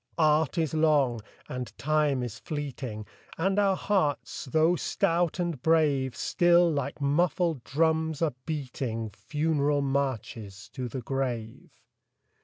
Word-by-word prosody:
Art 155 -2 +3
is 160 -3 0
long, 145 -7 +3 0.3
and 125 -1 -6
Time 145 0 +1
is 110 -2 -6
fleeting, 130 -7 -5 0.3
And 190 +4 +1
our 195 -2 +3
hearts, 185 -10 -1
though 160 +6 +3
stout 170 0 0
and 170 -7 -2
brave, 145 -5 +2
Still, 175 0 +3
like 140 -1 -3
muffled 155 0 +1
drums, 160 +2 +1
are 155 - +1
beating 125 -7 -3
Funeral 145 +4 0
marches 120 -7 -3
to 130 -2 -5
the 125 +2 -5
grave. 120 -3 -3
145 Hz, 120 wpm, -28 LUFS, 130-160 Hz, 0.3 s, Art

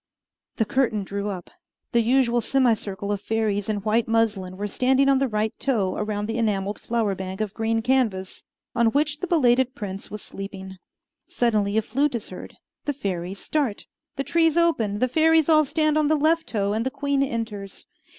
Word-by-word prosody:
The 225 - +2
curtain 225 -3 0
drew 200 +1 -4
up. 185 -3 -7 0.4
The 235 - +3
usual 240 0 +2
semicircle 215 -6 0
of 200 -1 -2
fairies 215 -2 -1
in 210 -2 -1
white 220 +1 +1
muslin 210 -5 0
were 205 - -3
standing 265 +5 +2
on 270 -1 +4
the 270 - +1
right 215 -1 -1
toe 210 -9 0
around 210 -1 -2
the 225 +2 -2
enameled 205 -2 -1
flower 225 -4 0
bank 190 +1 -6
of 215 -2 -2
green 225 0 -1
canvas, 225 -7 0 0.3
on 235 0 +3
which 290 +4 +1
the 365 - -3
belated 260 -6 +3
prince 195 -2 -6
was 210 0 -7
sleeping. 190 -1 -8 0.5
Suddenly 215 -3 +1
a 220 - +2
flute 275 +5 0
is 230 - -5
heard. 185 - -10 0.3
The 290 - 0
fairies 190 -7 -4
start. 270 -3 -2 0.3
The 275 - -2
trees 325 +1 +2
open, 275 -12 +2
the 255 - +2
fairies 320 +3 +3
all 310 -1 +5
stand 310 +1 +1
on 300 - +2
the 310 - +3
left 320 +2 +2
toe, 200 -2 -1
and 220 +1 0
the 260 - 0
queen 280 0 -1
enters. 225 -6 -4
225 Hz, 185 wpm, -24 LUFS, 205-270 Hz, 0.5 s, all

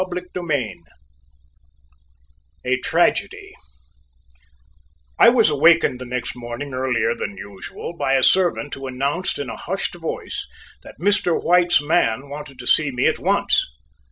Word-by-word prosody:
CHAPTER 180 0 -4 0.2
III 145 -9 -2 1.9
A 130 +1 +1
TRAGEDY - - 0 1.7
I - - +9
was 230 -9 +4
awakened 150 -3 +4
the - - -5
next 125 0 -4
morning 120 +3 -7
earlier 125 -3 0
than 100 -3 -6
usual 100 - -8
by 140 -4 +1
a 130 - +2
servant 175 -5 +2
who 135 0 -6
announced 140 +8 -2
in 145 - -4
a - - -6
hushed 195 +2 -3
voice 170 -2 -5 0.3
that - - -14
Mr. 185 -2 +2
White's 175 -3 +3
man 140 -5 +1
wanted 145 -2 -8
to 125 - -9
see 150 +3 +3
me 125 -2 -1
at - - +2
once. - - +2
140 Hz, 135 wpm, -21 LUFS, 125-170 Hz, 1.9 s, I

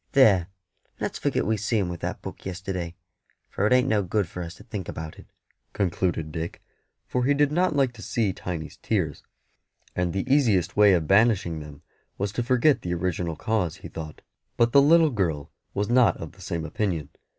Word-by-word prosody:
There, 100 -11 +5 0.5
let's - - -3
forget - - 0
we 110 +2 +1
see 110 +3 0
him 100 -4 +1
with 85 -1 -5
that - - -4
book - - -8
yesterday, 90 -2 -4 0.6
for 100 - +1
it - - -1
ain't 125 +1 +4
no 110 -4 +2
good 100 0 0
for 90 - -7
us 85 0 -6
to - - -14
think 105 -5 -6
about 80 -1 -7
it," - - -14 0.5
concluded 85 -4 -1
Dick; 80 +1 -5 0.5
for 125 - -1
he 140 +3 +3
did 145 0 +3
not 175 0 +2
like 135 -3 +2
to - - -12
see 110 -5 0
Tiny's 85 -5 -6
tears, - - -1 0.7
and 90 -1 0
the 95 +7 -2
easiest 120 - +3
way 105 -1 +6
of 85 -3 +2
banishing 100 -5 +3
them 75 -2 -11 0.3
was 100 0 -1
to 115 - -2
forget 130 +4 +3
the 90 0 -2
original 85 -1 -2
cause, 90 -1 -1
he - - -6
thought. 80 -2 -8 0.3
But 120 0 +3
the 140 - +7
little 160 +2 +5
girl 85 - -1 0.2
was 100 +1 0
not 120 0 +4
of 80 - -7
the 95 - -18
same 85 -4 -3
opinion. 80 -4 -2
95 Hz, 195 wpm, -26 LUFS, 85-120 Hz, 0.7 s, the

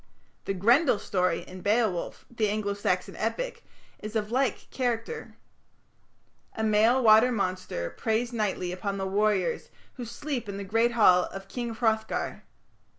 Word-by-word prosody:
The 195 - -2
Grendel 240 - +4
story 180 -3 0
in 185 0 -11
Beowulf, 210 -4 0
the 220 -3 0
Anglo 205 -1 -1
Saxon 200 - -1
epic, - - -3 0.4
is 215 +1 -7
of 215 0 -1
like 255 -2 0
character. 250 - -3 1.2
A 220 - -2
male 220 +4 +4
water 220 +3 +7
monster 185 - -2
preys 230 +2 -1
nightly 200 -5 -1
upon 195 +2 -3
the 195 - -2
warriors 200 -1 0 0.3
who 245 - -5
sleep 245 -1 -4
in 200 - -5
the 200 - -4
great 225 +4 +1
hall 185 -6 +5
of 195 0 -9
King 235 +1 -4
Hrothgar. 220 -1 -1
215 Hz, 145 wpm, -27 LUFS, 195-235 Hz, 1.2 s, water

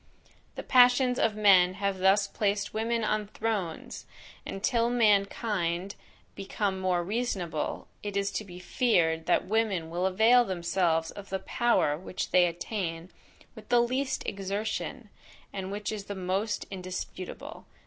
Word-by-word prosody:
The - - -6
passions 250 0 +5
of 220 -2 +2
men 190 -4 +5
have 200 -1 -2
thus 195 +2 +4
placed 200 0 -1
women 230 +1 -1
on 215 -1 0
thrones; 205 -6 -4 0.4
and, 195 - -6
till 235 -2 +2
mankind 200 -5 +1 0.4
become 195 0 -2
more 180 -2 0
reasonable, 190 -6 -3
it 205 -1 -4
is 200 0 0
to 215 - -3
be 180 -3 -11
feared 175 -5 +1
that - - +2
women 200 -6 0
will 180 +2 0
avail 225 +6 +5
themselves 170 -4 0
of 205 -1 -10
the 190 - -1
power 190 -10 +1
which 185 0 -5
they 180 -1 +5
attain 170 -1 -4 0.4
with - - -14
the 240 - +5
least 255 +3 0
exertion, 205 +4 -4 0.4
and 190 -1 -5
which 205 +1 -3
is 210 -2 -5
the 200 - -6
most 190 +3 -2
indisputable. 185 -1 -7
200 Hz, 140 wpm, -28 LUFS, 180-220 Hz, 0.4 s, passions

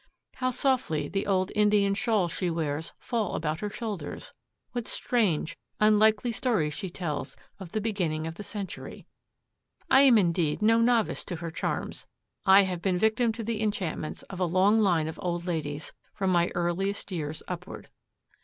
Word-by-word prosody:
How 255 0 0
softly 250 - 0
the 195 +5 -2
old 190 -1 +1
Indian 210 -1 +3
shawls 205 -5 +1
she 175 +1 -1
wears 160 -2 -2
fall 225 -5 -2
about 155 0 -2
her 210 - -3
shoulders! 205 -7 -6 0.4
What 240 -2 -4
strange, 190 -10 0 0.2
unlikely 215 +2 +4
stories 215 - 0
she 190 +4 -4
tells 170 -4 -4 0.2
of 190 -2 -9
the 215 - 0
beginning 175 -8 -1
of 165 - -4
the 190 - -8
century! 200 -3 -7 0.9
I 265 - +8
am 260 -4 +7
indeed 170 -5 +1
no 225 +1 +5
novice 235 -1 +2
to 180 - -4
her 165 0 -5
charms. - - -3 0.4
I 195 +1 +8
have 180 -2 -3
been 185 -1 +1
victim 220 +4 +2
to 225 0 -5
the 220 -1 -2
enchantments 195 -7 -2
of 190 - -9
a 185 - +2
long 190 +5 +4
line 175 -7 +3
of 160 - -6
old 175 -2 -2
ladies 150 -4 -3 0.2
from 190 -2 0
my 175 -1 +3
earliest 185 +4 -1
years 155 -3 -4
upward. 180 0 -7
190 Hz, 165 wpm, -28 LUFS, 170-215 Hz, 0.9 s, I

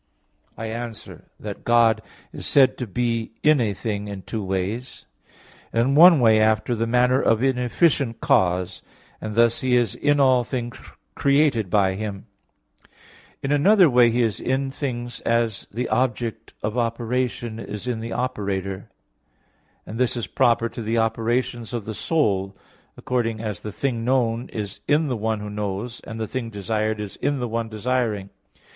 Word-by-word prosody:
I 115 - -5
answer 115 0 -7
that, - - -7
God 115 -2 +4 0.3
is - - -6
said 135 -2 +5
to 125 - -3
be 115 +2 -2
in 150 -3 +5
a 110 -3 +1
thing 105 -1 -3
in 100 -2 -7
two 110 -3 -4
ways; 95 +6 -4 0.7
in 120 +4 +2
one 165 +1 +8
way 110 -3 +5
after 110 +2 +2
the 115 0 -1
manner 125 +2 +3
of 115 +2 +2
an 135 -2 +2
efficient 125 -1 +1
cause; 95 - +1 0.4
and 110 -1 -5
thus 115 0 +3
He 125 -1 +3
is 120 -5 +1
in 145 0 +1
all 130 -3 +4
things 120 -1 -4 0.4
created 140 -7 +2
by 95 -1 +3
Him; 100 0 -5 1.2
in 135 - -1
another 185 +6 +5
way 120 -1 +6
he 120 +1 +1
is 110 -3 -1
in 135 +1 -1
things 120 -4 -4
as 115 -3 0
the 120 +4 -3
object 115 -3 -1
of 110 +3 -1
operation 120 0 -2
is 105 +1 -7
in 120 -3 -1
the 115 +1 -6
operator; 100 -6 -3 1.0
and 115 - -7
this 125 -1 +1
is 115 - -2
proper 115 +3 +2
to 115 - -8
the 115 +1 -1
operations 115 +1 -1
of 115 -4 -4
the 110 - -4
soul, 100 - 0 0.4
according 115 -3 -1
as 105 -4 -4
the 105 - -6
thing 120 +1 -2
known 120 -1 0
is 105 -3 -6
in 150 0 +2
the 125 - 0
one 110 -1 -2
who 105 - -6
knows; 105 +3 -4
and 115 0 -7
the 110 - -1
thing 115 +1 -4
desired 110 +1 -2
in 105 +7 -2
the 125 - -2
one 115 0 -3
desiring. 110 -3 -1
115 Hz, 165 wpm, -23 LUFS, 110-125 Hz, 1.2 s, one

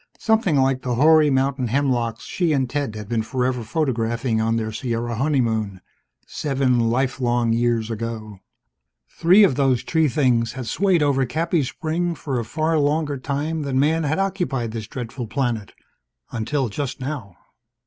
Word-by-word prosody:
Something 220 -8 +2
like 135 -1 +2
the 125 -1 -2
hoary 155 +3 +5
mountain 135 -1 +1
hemlocks 120 -3 0
she 170 -4 0
and 135 -3 +1
Ted 140 -4 -3
had 105 -1 -7
been 115 0 0
forever 125 +2 -1
photographing 115 -3 -1
on 115 +1 +1
their 110 -1 -2
Sierra 115 +1 -3
honeymoon, 115 -7 0 0.5
seven 135 -4 0
life 125 +3 0
long 120 -1 +1
years 115 -1 0
ago. 110 -2 -5 0.7
Three 185 +5 +5
of 190 - +4
those 135 -3 +2
tree 160 -2 +2
things 125 -5 +1
had 130 -3 -6
swayed 180 - +2
over 140 -2 +2
Cappy's 160 +1 0
spring 170 +1 -2
for 135 -5 -3
a - - -2
far 155 +6 0
longer 145 -1 0
time 150 +4 -2
than 135 -2 -1
Man 160 +4 +2
had 155 0 0
occupied 180 - -1
this 110 -1 -5
dreadful 120 0 -6
planet. 120 -4 -2 0.6
Until 125 +4 -1
just 130 +4 -4
now 130 - -5
130 Hz, 160 wpm, -22 LUFS, 115-150 Hz, 0.7 s, hoary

